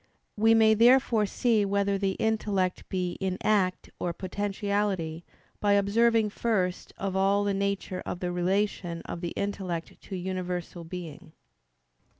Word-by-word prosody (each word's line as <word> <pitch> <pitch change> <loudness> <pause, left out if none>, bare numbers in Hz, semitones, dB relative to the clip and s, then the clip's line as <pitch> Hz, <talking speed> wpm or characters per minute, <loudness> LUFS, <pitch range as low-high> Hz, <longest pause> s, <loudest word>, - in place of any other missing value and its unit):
We 225 +2 +5
may 220 -1 +6
therefore 230 -1 +4
see 225 -1 +2
whether 200 0 +1
the 195 -1 +1
intellect 205 -4 -1
be 180 -2 -2
in 190 -1 -1
act 195 -4 +1
or 175 - -1
potentiality 195 -3 -2 0.4
by 205 -1 +3
observing 215 +2 +3
first 190 -6 -1
of 195 -1 -3
all 195 +1 +3
the 200 0 0
nature 195 -1 -2
of 175 - -5
the 180 -1 -2
relation 180 -1 -1
of 170 - -6
the 175 - -2
intellect 185 -4 -4
to 195 - -7
universal 180 -1 -4
being. 165 -1 -8
195 Hz, 140 wpm, -28 LUFS, 180-210 Hz, 0.4 s, may